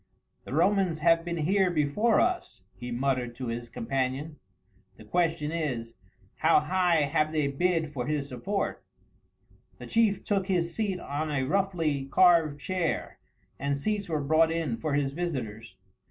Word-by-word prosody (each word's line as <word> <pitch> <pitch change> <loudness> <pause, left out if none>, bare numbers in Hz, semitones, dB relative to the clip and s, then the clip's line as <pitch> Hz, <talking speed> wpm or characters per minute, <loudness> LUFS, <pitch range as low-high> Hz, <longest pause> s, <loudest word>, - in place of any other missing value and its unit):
"The - - -7
Romans 180 +1 +2
have 165 0 +4
been 170 0 -3
here 185 +4 +2
before 175 +8 +2
us," 360 0 -1
he 125 0 -8
muttered 125 -1 -1
to 125 -1 -5
his 120 0 -5
companion; 135 +6 -3 0.6
"the 110 - -13
question 165 +1 0
is, 130 -9 -3 0.4
how 160 +1 +5
high 180 -3 +2
have 155 +1 +1
they 155 -2 +1
bid 160 +2 0
for 125 -3 -3
his 150 -2 -1
support." 170 +11 -3 0.9
The - - -9
chief 225 -3 +2
took 195 -2 0
his 170 -3 0
seat 200 -3 -1
on 155 +1 -3
a 140 -3 0
roughly 165 -4 0
carved 160 -1 +4
chair, 180 +1 -2 0.4
and 140 +1 -1
seats 205 +5 -2
were 155 -2 0
brought 160 +3 +3
in 165 -7 -1
for 145 +4 -2
his 140 -2 0
visitors. 115 - -4
155 Hz, 155 wpm, -28 LUFS, 135-180 Hz, 0.9 s, how